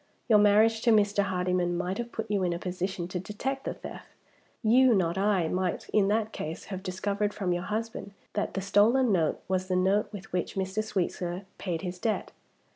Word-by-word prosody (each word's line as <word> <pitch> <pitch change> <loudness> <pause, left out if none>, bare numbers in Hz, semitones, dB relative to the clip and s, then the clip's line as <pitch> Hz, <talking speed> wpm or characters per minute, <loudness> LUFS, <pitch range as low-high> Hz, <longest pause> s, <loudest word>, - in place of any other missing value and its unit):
Your 215 -3 +6
marriage 215 +2 +5
to 240 - +2
Mr. 205 -1 +4
Hardyman 180 -2 0
might 185 +4 -2
have 240 0 -4
put 225 - -4
you 200 -2 +1
in 180 -2 +1
a - - -2
position 180 0 -3
to 185 - -3
detect 265 +9 -4
the - - -3
theft. - - -9 0.6
You, 245 +2 +5
not 170 -3 +1
I, 195 -3 +2
might, 180 +1 -1
in 205 -2 +3
that 215 +1 +1
case, 160 +2 -5
have 190 - -4
discovered 200 +2 -2
from 190 -4 0
your 175 - -1
husband 215 -1 -4 0.2
that 210 - -2
the 195 - -1
stolen 215 +6 +4
note 165 -5 +1
was 185 0 -1
the 185 - 0
note 190 +3 +2
with 195 -4 -9
which 180 -2 -2
Mr. 190 +2 -1
Sweetsir 180 -2 -2
paid 170 -3 -3
his 180 -1 -5
debt. 220 +1 -1
195 Hz, 200 wpm, -28 LUFS, 180-210 Hz, 0.6 s, Your